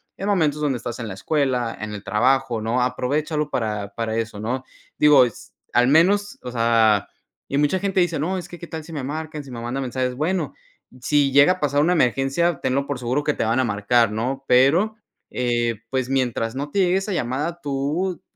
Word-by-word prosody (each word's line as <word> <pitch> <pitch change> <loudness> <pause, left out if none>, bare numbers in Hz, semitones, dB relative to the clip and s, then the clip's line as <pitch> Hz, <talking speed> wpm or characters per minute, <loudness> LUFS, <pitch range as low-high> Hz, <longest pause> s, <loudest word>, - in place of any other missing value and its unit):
en 195 - -5
momentos 155 -7 +1
donde 140 -4 0
estás 120 0 -6
en 115 -2 -5
la - - -6
escuela, 125 0 -1
en 110 -1 -5
el 105 - -6
trabajo, 125 +1 +1
¿no? 115 +3 0
Aprovéchalo 150 +4 -1
para 105 -3 -3
para 115 -1 -3
eso, 115 -2 -3
¿no? 125 +5 -3 0.3
Digo, 145 -4 +6
s 120 - -8 0.2
al 125 +1 +4
menos, 200 +7 +3
o 125 - -6
sea 115 -3 +3 0.4
y 140 - -1
mucha 150 +6 +2
gente 195 0 0
dice: 175 -3 +1
"No, 185 +6 -1
es 175 -1 -6
que 175 - -10
qué 170 - -9
tal 160 -2 -7
si 165 - -10
me 145 -4 -4
marcan, 155 +2 -5
si 135 - -12
me 120 - -6
mandan 125 +3 -3
mensajes", 125 0 -2
bueno, 175 +7 -1 0.5
si 140 0 +2
llega 140 +5 +7
a 185 - -11
pasar 145 -1 +1
una 165 +4 +3
emergencia, 135 +3 +1
tenlo 140 +2 0
por 140 -3 -3
seguro 130 +4 -1
que 150 - +2
te - - -2
van 115 +3 +1
a 130 - +2
marcar, 110 +1 +2
¿no? 130 +5 -3
Pero, 155 +13 +4 0.3
eh, 120 -3 -1
pues 130 0 -1
mientras 125 -3 -1
no 145 +2 -4
te 200 - 0
llegue 180 -1 +3
esa 195 +1 -3
llamada, 150 +3 -2
tú 150 +7 -2
135 Hz, 210 wpm, -22 LUFS, 120-155 Hz, 0.5 s, llega